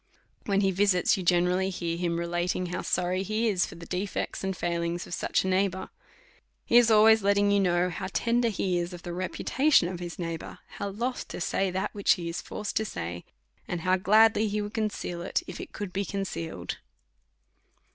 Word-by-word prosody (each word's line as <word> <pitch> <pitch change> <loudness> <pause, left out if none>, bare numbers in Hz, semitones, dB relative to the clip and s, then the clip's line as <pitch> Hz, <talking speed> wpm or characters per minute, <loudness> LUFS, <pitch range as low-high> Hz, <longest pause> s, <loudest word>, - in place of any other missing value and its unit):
When 200 -1 +2
he 195 -1 +2
visits, 190 -1 +3
you 195 - -4
generally 180 +1 +2
hear 170 -3 -3
him 170 -1 -1
relating 175 +1 -1
how 180 +1 -3
sorry 180 +1 0
he 215 +4 0
is 190 -4 +2
for - - -10
the 170 0 -10
defects 185 +3 -3
and 190 -1 -2
failings 170 0 -2
of - - -8
such - - 0
a - - -2
neighbour. 190 0 0 0.8
He 235 - +5
is 240 -1 +6
al 215 -1 +6
ways 220 0 +6
letting 200 +1 +3
you 200 - +4
know 180 -1 +2
how - - -4
tender 235 +2 +1
he 185 -4 0
is 175 +1 -3
of 175 -1 -9
the 175 - -5
repu 185 +2 -4
tation 270 - +4
of 175 - -6
his 175 -1 -6
neighbour; 165 -2 -5 0.2
how 200 - -2
loth 240 +6 -3
to - - -7
say 195 +2 0
that 190 +3 -2
which 200 -1 +3
he 175 -3 -5
is 170 - -3
forced 210 -1 -5
to 220 - +2
say; 85 - -5 0.4
and 175 -2 -3
how 185 +2 +3
gladly 215 +3 +4
he 210 +1 -1
would 205 +1 -4
conceal 210 -5 -3
itj 170 - -1
if - - -7
it - - -9
could 200 -3 -6
be 200 - 0
concealed. 195 - -4
185 Hz, 205 wpm, -28 LUFS, 175-205 Hz, 0.8 s, is